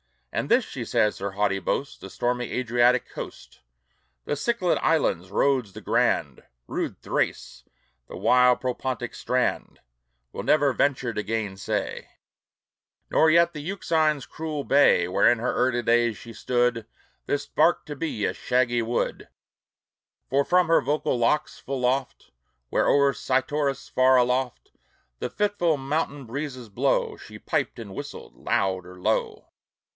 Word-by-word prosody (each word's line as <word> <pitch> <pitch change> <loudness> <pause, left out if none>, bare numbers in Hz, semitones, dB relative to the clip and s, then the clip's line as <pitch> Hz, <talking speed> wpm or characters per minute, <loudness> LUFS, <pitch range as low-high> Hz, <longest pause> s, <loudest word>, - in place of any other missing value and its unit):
And - - -2
this, - - +4
she - - -6
says, 105 - +1
her 100 0 -3
haughty 100 -1 0
boast, 135 +9 -3
The 95 - -8
stormy 120 +3 -2
Adriatic 125 0 +2
coast, - - -9 0.7
The - - -1
Cyclad 185 +2 0
islands, 145 - +1
Rhodes 125 -1 +1
the - - -9
grand, - - 0 0.3
Rude - - -3
Thrace, - - -2 0.4
the - - -9
wild 125 0 +4
Propontic 125 -1 -3
strand, 125 0 -1 0.5
Will - - -5
never 145 -3 +3
venture 130 -4 0
to 105 - -2
gainsay; 105 -2 -3 1.0
Nor 160 - +5
yet 170 +1 +4
the 150 - -6
Euxine's 160 -5 0
cruel 155 -2 -5
bay, 135 -12 +4
Where 90 - +4
in 120 - +3
her 125 +2 -1
early 120 -1 +1
days 120 -1 +2
she 115 - -11
stood, 120 -2 0 0.4
This 145 0 -1
bark 160 +4 +2
to 150 - -6
be, 135 -8 -2
a - - 0
shaggy 120 -1 +1
wood; 115 +1 -2 1.0
For 140 +2 +2
from 180 -1 +3
her 165 - +4
vocal 145 -3 -1
locks 120 +6 0
full 135 -2 -3
oft, 130 +1 -2 0.4
Where - - +1
o'er 140 -1 +4
Cytorus 140 +1 -1
far 130 0 +4
aloft 125 0 0 0.5
The - - -3
fitful 200 -7 0
mountain 140 0 -2
breezes 130 -1 -6
blow, 100 - 0
She - - -11
piped - - -2
and 105 -4 -8
whistled 145 +7 -8
loud 95 -2 -1
or 90 0 -12
low. - - -1
130 Hz, 145 wpm, -25 LUFS, 115-145 Hz, 1.0 s, Nor